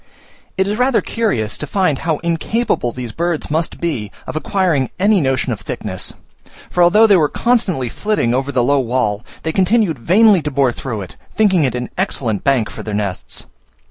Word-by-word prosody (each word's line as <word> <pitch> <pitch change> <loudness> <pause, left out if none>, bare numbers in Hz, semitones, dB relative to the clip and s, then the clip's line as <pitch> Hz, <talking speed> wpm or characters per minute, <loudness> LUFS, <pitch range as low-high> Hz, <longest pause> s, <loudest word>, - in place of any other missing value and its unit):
It 190 - +2
is 205 +2 -2
rather 255 -1 +3
curious 120 - -1
to 150 - -3
find 180 -5 +1
how 160 -2 -1
incapable 170 - 0
these 120 -1 -6
birds 170 0 -2
must 160 +2 -1
be 120 - -2
of - - -6
acquiring 155 -5 0
any 200 0 +3
notion 130 -2 0
of - - -8
thickness, - - -4 0.6
for 180 - +1
although 195 +6 +6
they 205 -3 +6
were 150 -3 +2
constantly 210 - 0
flitting 205 - 0
over 135 +2 -1
the 125 -3 +1
low 140 +3 +3
wall, 115 -4 -1 0.2
they 160 - -1
continued 190 - +2
vainly 195 - +5
to 150 - -3
bore 135 -3 +2
through 115 -3 -5
it, 95 - -10 0.2
thinking 190 -6 +3
it 125 -2 -1
an 125 0 -4
excellent 120 - -1
bank 130 -6 +2
for - - -8
their 105 -2 -4
nests. 100 -3 -4
155 Hz, 185 wpm, -17 LUFS, 125-190 Hz, 0.6 s, although